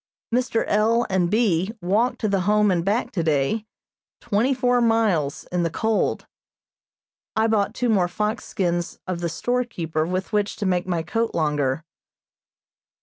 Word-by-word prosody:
Mr. 245 -2 +1
L. 225 +3 +2
and 180 -2 +2
B. 200 -4 +2
walked 210 +7 +1
to 220 - +1
the 200 -1 +1
Home 210 -1 +4
and 175 -2 +1
back 205 +6 0
today 165 +5 0 0.5
twenty 220 +6 +1
four 250 -2 +2
miles 215 -11 +1
in 180 0 0
the 170 - +1
cold. 220 +6 0 1.1
I 220 - +3
bought 215 -1 +1
two 250 - 0
more 195 -6 +3
fox 210 +6 -2
skins 175 -3 -2
of 185 -2 -3
the 170 -1 -2
storekeeper 170 -7 -2
with 185 +3 -3
which 205 -1 0
to 205 - -4
make 180 -1 0
my 170 -3 -1
coat 230 +5 -1
longer. 150 -2 0
200 Hz, 150 wpm, -23 LUFS, 175-225 Hz, 1.1 s, Home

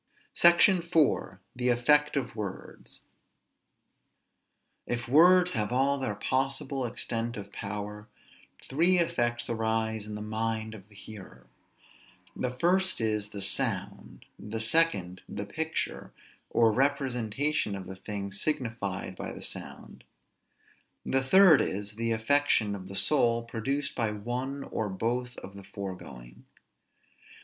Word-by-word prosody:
SECTION 175 +2 +6
IV. 165 -3 +1 0.2
THE 125 0 0
EFFECT 145 +5 +3
OF 125 -5 -3
WORDS. 105 -4 -8 1.9
If 120 0 -3
words 180 +6 +6
have 105 -1 -1
all 135 +3 +2
their 130 -6 -2
possible 135 +3 -1
extent 115 0 -4
of 100 -1 -8
power, 105 +1 -6 0.6
three 170 +7 +3
effects 120 -8 0
arise 110 -1 -1
in 105 - -6
the 105 - -6
mind 110 0 -2
of 100 -1 -13
the 105 - -18
hearer. 100 -1 -12 0.9
The 125 - -2
first 185 +3 +2
is, 105 -2 0
the 100 -2 -4
sound; 100 - -2
the 110 +2 -5
second, 110 - +1
the 100 - -5
picture, 160 +10 -3 0.4
or 115 -1 +4
representation 135 -2 0
of 95 - -7
the 95 - -8
thing 100 0 -5
signified 115 -5 -2
by - - -5
the - - -8
sound; - - -4 1.0
the 135 - +1
third 185 +4 +7
is, 100 +1 -3
the 115 +2 -2
affection 115 -2 +2
of 95 -2 -7
the 100 - -7
soul 115 +1 +3
produced 135 +5 -2
by 115 -3 0
one 125 +6 -4
or 110 -5 -3
by 95 - -7
both 125 +3 -2
of 100 - -8
the 100 - -10
foregoing. 85 -13 -9
115 Hz, 130 wpm, -29 LUFS, 105-135 Hz, 1.9 s, third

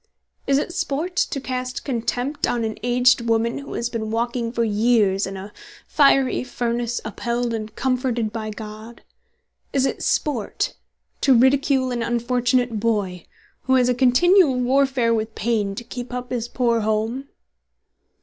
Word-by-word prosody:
"Is 275 0 +3
it 320 +4 -2
sport 330 +6 -2
to 335 -6 0
cast 255 -1 -4
contempt 250 +2 -1
on 235 -1 -1
an 220 -1 -2
aged 245 0 +3
woman 230 +3 +1
who 280 - -8
has 235 - -1
been 225 -2 -4
walking 235 +1 -1
for 235 -1 0
years 210 -3 +2
in 195 0 -6
a 195 +2 -9 0.3
fiery 275 -4 +3
furnace 240 -1 -2
upheld 235 +2 -2
and 215 -1 -5
comforted 245 -4 -1
by 220 -1 -4
God? 215 +2 -9 0.7
Is 270 -1 +2
it - - -2
sport 255 -9 -1 0.5
to 265 -3 +5
ridicule 265 +1 +3
an 240 -1 -2
unfortunate 240 0 0
boy 205 -5 -1 0.4
who 260 - +3
has 250 -1 +3
a - - +3
continual 270 +6 +4
warfare 260 -2 +2
with 220 0 -2
pain 210 -3 -1
to 240 - -6
keep 245 +1 -7
up 250 0 -5
this 240 -2 -2
poor 240 -2 +1
home?" 220 +5 -1
240 Hz, 150 wpm, -22 LUFS, 225-255 Hz, 0.7 s, to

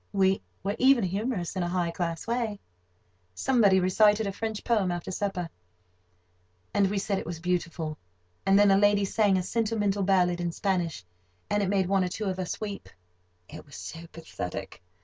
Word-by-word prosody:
We 195 -1 +3 0.2
were 200 +2 -1
even 260 -3 +5
humorous—in 190 -1 -2
a 175 - -1
high 175 -1 0
class 170 -1 -3
way. 230 -3 -2 0.8
Somebody 205 - +4
recited 210 +4 +4
a 200 - -1
French 220 +1 -4
poem 210 -6 +1
after 175 +1 -4
supper, 185 -2 -2 1.3
and 200 -1 +3
we 205 - -1
said 195 0 -1
it - - -7
was 170 -1 -5
beautiful; 165 -3 -2 0.4
and 195 0 +4
then 205 -1 +6
a 195 - +5
lady 205 0 +4
sang 200 -1 +2
a 185 - -1
sentimental 210 -1 0
ballad 180 -2 +2
in 170 -1 -2
Spanish, 175 - -1 0.5
and 205 - +2
it 195 - 0
made 190 -2 +2
one 195 0 +2
or 180 - -1
two 210 +4 -4
of 190 -1 -2
us 180 - -3
weep—it 90 - -10
was 140 - -14
so 165 0 -8
pathetic. 160 - -7
190 Hz, 170 wpm, -28 LUFS, 175-205 Hz, 1.3 s, then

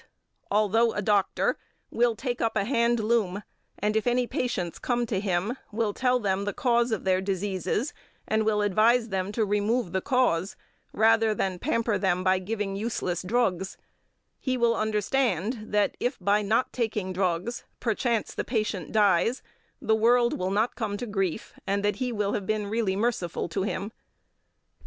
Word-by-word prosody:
although 215 +3 +3
a 205 - -2
doctor, 205 -1 +1 0.3
will 235 -1 +2
take 245 +1 -3
up 225 - 0
a 200 - +2
hand 235 0 +2
loom 210 -3 0 0.3
and, 210 +1 0
if 220 +2 +1
any 245 +1 +2
patients 195 -9 -2
come 240 -1 0
to 215 -4 -1
him, 195 +4 -1 0.2
will 215 -1 0
tell 250 +1 +2
them 195 -3 0
the 205 0 -2
cause 240 -1 +2
of 220 - -1
their 185 -1 +2
diseases, 195 - -2 0.3
and 220 0 +1
will 210 -1 +1
advise 225 +4 +3
them 190 0 -2
to 220 +1 0
remove 210 0 0
the 190 +1 0
cause, 245 -9 +1 0.4
rather 225 0 +3
than 190 -2 -1
pamper 230 - 0
them 185 -2 +1
by 185 0 +3
giving 200 0 -3
useless 195 -5 -2
drugs; 190 -3 0 0.6
he 260 -1 -1
will 235 -1 +3
understand 215 0 0
that, 210 -1 +2
if 250 +2 -1
by 205 +1 +2
not 220 +5 +1
taking 215 -6 -2
drugs, 185 +5 -1 0.2
perchance 230 -1 0
the - - -2
patient 215 -7 -2
dies, 210 +3 +3 0.4
the 220 - +1
world 235 +2 +3
will 185 +1 -2
not 215 +5 +1
come 210 -3 -2
to 245 - -4
grief, 195 -3 -2
and 200 +1 0
that 205 - +1
he 250 -1 -2
will 205 -3 -1
have 195 -2 -3
been 215 -1 0
really 205 -2 0
merciful 205 -7 -1
to 190 +3 -2
him; 195 -1 -2
9. 205 - -7
215 Hz, 170 wpm, -27 LUFS, 195-235 Hz, 0.6 s, although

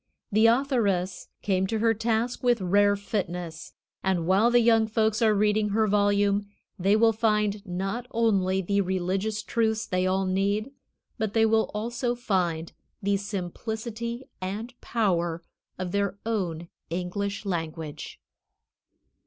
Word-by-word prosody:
The 215 +2 +5
authoress 230 -8 +1 0.2
came 190 -1 +1
to 225 - -1
her 225 +1 +3
task 225 +2 -1
with 245 -2 +3
rare 200 +2 +3
fitness, 180 -5 -4 0.3
and 185 -3 +1
while 195 +6 +4
the 240 0 +5
young 225 -1 +4
folks 220 0 +1
are 220 -2 +4
reading 210 +1 +2
her 220 +2 +2
volume 205 0 +2 0.3
they 195 +3 +3
will 225 +1 +4
find 210 -2 +1
not 195 +7 -3
only 190 -5 +1
the 200 +3 +1
religious 190 +3 -1
truths 220 -1 0
they 185 0 0
all 190 +1 +1
need, 200 +6 0 0.5
but 220 -1 -2
they 225 0 +5
will 220 0 +2
also 240 +3 -1
find 180 -9 -1 0.3
the 200 +1 +2
simplicity 220 +5 -4 0.2
and 210 +7 -4
power 175 -7 0 0.3
of 185 -1 -4
their 200 0 0
own 175 -7 -2 0.2
English 195 +4 -3
language. 165 -4 -4
205 Hz, 135 wpm, -27 LUFS, 185-225 Hz, 0.5 s, The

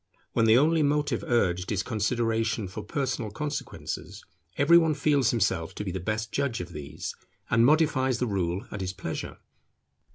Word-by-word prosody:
When 115 - +3
the 110 +1 +7
only 160 +4 +4
motive 145 0 +1
urged 90 -6 +1
is 100 -2 0
consideration 115 -1 0
for 100 +4 -6
personal 130 -3 -2
consequences, 145 +7 -5 0.3
every 170 +5 +7
one 160 -2 +1
feels 140 -4 +2
himself 95 -8 0
to - - -4
be 95 - -3
the 95 - -3
best 110 +4 -3
judge 135 -5 -1
of 90 -1 -7
these, 75 -2 -6 0.4
and 115 -1 +5
modifies 130 -3 +3
the 125 - 0
rule 95 -3 -1
at 100 - -5
his 95 0 -3
pleasure. 90 -4 -5
115 Hz, 165 wpm, -27 LUFS, 95-140 Hz, 0.4 s, the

